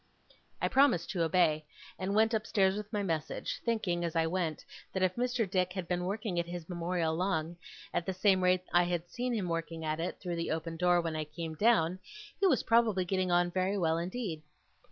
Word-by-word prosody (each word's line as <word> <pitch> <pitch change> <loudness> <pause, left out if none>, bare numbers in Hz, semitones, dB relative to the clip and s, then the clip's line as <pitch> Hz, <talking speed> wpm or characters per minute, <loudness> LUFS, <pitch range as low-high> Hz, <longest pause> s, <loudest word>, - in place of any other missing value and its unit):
I - - +1
promised 270 -10 +3
to 180 - -1
obey, 160 -2 +3 0.4
and 190 +2 -1
went 220 +1 +4
upstairs 200 -3 +2
with 210 0 -6
my 205 -2 -1
message; 165 -5 -3
thinking, 200 -7 0
as 170 -1 -3
I 165 0 +3
went, 165 -2 -2 0.3
that 190 - 0
if 185 -1 +2
Mr. 245 -2 0
Dick 185 0 0
had 185 -3 -4
been 180 0 -1
working 200 -2 -2
at 170 - -2
his 175 -2 -6
Memorial 170 -2 -1
long, 170 -1 -1 0.4
at 175 - -1
the - - +1
same 190 0 +3
rate 180 0 +4
as - - -25
I 175 - +6
had 175 -1 -2
seen 245 +1 -2
him 210 -6 -1
working 165 -1 -3
at 155 0 -1
it, 170 - -3
through 175 -3 -4
the 165 - -2
open 165 +1 -3
door, 175 +1 +3
when 165 -1 -3
I 155 0 -2
came 160 +2 -6
down, 185 -2 +3 0.4
he 395 - +4
was - - +3
probably 225 -5 +3
getting 185 0 0
on 175 0 +3
very 190 +2 0
well 165 -3 +1
indeed. 180 -2 -4
180 Hz, 215 wpm, -31 LUFS, 165-200 Hz, 0.4 s, I